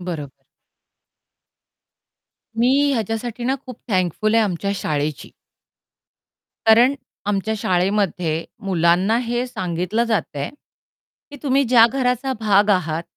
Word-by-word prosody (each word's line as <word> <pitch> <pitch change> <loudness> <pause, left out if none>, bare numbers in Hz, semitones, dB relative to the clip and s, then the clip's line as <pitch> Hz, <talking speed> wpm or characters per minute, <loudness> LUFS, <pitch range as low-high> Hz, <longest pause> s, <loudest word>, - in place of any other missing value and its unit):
बरोबर. 155 -7 -6 2.2
मी 240 +2 +3 0.2
ह्याच्यासाठी 225 +1 -3
ना 260 +2 +1
खूप 255 - -9
थँकफुल 190 +3 +1
आहे 225 - +5
आमच्या 200 0 -2
शाळेची. 150 -5 -3 1.4
कारण 235 +5 +6 0.3
आमच्या 205 +2 -1
शाळेमध्ये 180 -4 0 0.2
मुलांना 185 +3 +2
हे 240 +2 -1
सांगितलं 185 0 -2
जातंय 200 -11 -2 0.8
की 290 - -9
तुम्ही 275 -1 +2
ज्या 235 -2 +6
घराचा 255 0 0
भाग 205 -1 +3
आहात, 165 -4 0
205 Hz, 100 wpm, -21 LUFS, 175-235 Hz, 2.2 s, कारण